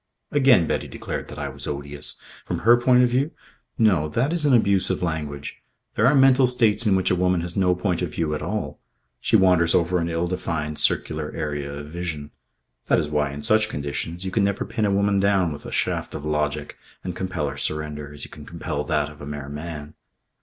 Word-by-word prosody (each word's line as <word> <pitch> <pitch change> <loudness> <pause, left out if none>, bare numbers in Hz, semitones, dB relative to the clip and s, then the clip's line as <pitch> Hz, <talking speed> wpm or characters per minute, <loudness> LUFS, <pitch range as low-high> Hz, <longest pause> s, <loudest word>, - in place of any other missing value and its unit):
Again 130 - +5
Betty - - -2
declared - - -5
that - - -10
I 75 -1 -3
was 65 -1 -9
odious. 70 0 -5 0.3
From - - -4
her 120 +1 +8
point 125 +1 +4
of 125 - +3
view 130 +5 +1 0.5
No. 95 -10 +3
That 130 - 0
is 160 -4 0
an 140 - +4
abuse 100 -4 +3
of - - -1
language. 75 -4 -4 0.3
There 110 - +3
are 140 - +5
mental 135 -1 +6
states 115 -3 +2
in 100 - +4
which 95 0 +1
a - - +3
woman 90 -1 +2
has 85 0 -5
no 90 -2 +3
point 90 -1 -1
of 90 -4 -2
view 80 -2 0
at 75 - -3
all. - - -3 0.4
She - - +1
wanders 90 -3 +4
over 90 +1 +2
an 85 0 -1
ill 85 +1 -1
defined 80 -4 -3
circular - - +2
area 75 -2 -3
of 75 +1 -7
vision. 80 -4 -5 0.6
That - - +4
is 75 - -1
why, 75 -1 0
in 70 +1 -7
such 110 +4 +3
conditions, 75 +5 -4
you 95 - -3
can 105 +1 +2
never 100 0 0
pin 110 - -1
a 100 - +2
woman 100 0 +2
down 95 -4 +2
with 70 - -9
a - - -7
shaft - - -1
of 75 - -6
logic 75 -1 -2 0.2
and 90 -2 -4
compel 90 -5 -2
her 70 - -4
surrender, 75 -1 -4
as 75 - -11
you - - -15
can 75 - -11
compel 80 -3 -4
that 75 -1 +1
of 75 -1 -12
a 75 - -7
mere 75 -1 -6
man. 75 0 -7
85 Hz, 220 wpm, -24 LUFS, 75-100 Hz, 0.6 s, her